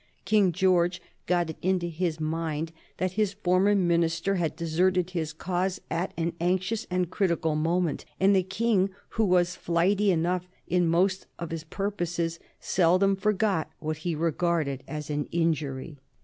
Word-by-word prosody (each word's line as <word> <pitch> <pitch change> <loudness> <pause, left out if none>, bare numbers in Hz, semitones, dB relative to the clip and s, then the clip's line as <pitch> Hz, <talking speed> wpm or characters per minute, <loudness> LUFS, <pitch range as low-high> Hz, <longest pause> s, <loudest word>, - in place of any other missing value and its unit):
King 200 -2 +4
George 180 0 +2 0.3
got 175 -2 +1
it - - -12
into 185 -1 +1
his 165 -1 -2
mind 160 0 -2 0.3
that 185 0 0
his 205 0 0
former 195 +1 +2
minister 170 0 +2
had 175 -5 -1
deserted 180 +2 +1
his 160 -3 -2
cause 180 +3 -2
at 170 +3 -1
an 170 0 -1
anxious 185 +5 0
and 180 -1 0
critical 170 -5 +1
moment, 165 +1 0
and 195 +1 +5
the 190 - +4
King, 195 +1 +1 0.2
who 225 - 0
was 180 -1 +2
flighty 185 +4 +2
enough 180 +1 +1 0.2
in 180 -1 +2
most 185 +3 +1
of 170 -1 -6
his 165 -1 -4
purposes, 175 -3 -2 0.2
seldom 185 +3 +3
forgot 195 -4 +1
what 155 0 -3
he 165 +1 -2
regarded 160 -4 0
as 150 -1 -5
an 145 0 -1
injury. 155 -3 -1
175 Hz, 150 wpm, -27 LUFS, 165-185 Hz, 0.3 s, and